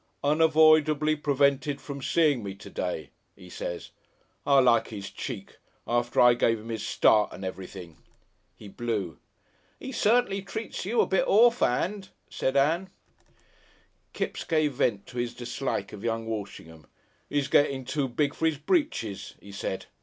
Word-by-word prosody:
"'Unavoidably 155 0 +4
prevented 140 -1 +1
from 140 -1 -7
seein' 150 -3 +2
me 100 -2 -6
to 100 - -12
day,' 80 -5 -4 0.3
'e 90 - -13
says. 85 0 -6 0.6
I 140 -1 +5
like 120 -3 +3
'is 100 -3 -7
cheek. 110 -8 -7 0.3
After 120 0 0
I 125 0 +7
give 115 -1 +2
'im 115 +2 -8
'is 110 -1 -4
start 105 -1 +3
and 95 - -8
everything." 90 -3 -8 0.6
He 105 - -12
blew. 100 -5 -4 0.6
"'E 265 - -7
certainly 225 -4 +2
treats 195 0 -6
you 225 +4 +2
a - - +3
bit 190 - +1
orf'and," 205 - +3 0.2
said 130 +1 -1
Ann. 165 +7 +2 1.2
Kipps - - -3
gave 155 -4 +1
vent 105 -5 0
to 125 - -7
his 120 -1 -3
dislike 125 +2 -4
of 105 - -9
young 115 -1 -2
Walshingham. 100 -7 -7 0.4
"He's 145 -1 0
getting 140 -2 +2
too 135 +2 -1
big 140 +4 0
for 160 - 0
'is 160 -3 0
britches," 150 - -1
he 100 - -13
said. 95 -1 -4
135 Hz, 150 wpm, -27 LUFS, 110-155 Hz, 1.2 s, I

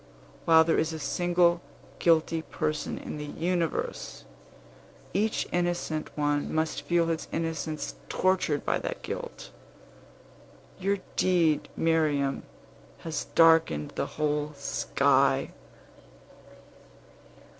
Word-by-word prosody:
While 160 -1 +7
there 165 0 +2
is 160 +1 0
a - - -4
single 175 +1 +2 0.4
guilty 165 -1 +3
person 155 -1 -3
in - - -6
the 150 - -4
universe, 170 +2 -2 0.9
each 215 +4 0
innocent 175 -3 -1
one 145 -1 0
must 155 -3 -1
feel 170 +3 +2
his 165 -1 -2
innocence 160 -2 -3 0.2
tortured 185 -6 +1
by - - +1
that - - -5
guilt. - - -6 1.3
Your 200 +2 +1 0.2
deed, 170 -5 +2
Miriam, 150 -4 +1 0.6
has 160 -2 -3
darkened 160 - +5
the - - -2
whole 150 0 0
sky!" 140 - +2
160 Hz, 100 wpm, -28 LUFS, 150-175 Hz, 1.3 s, While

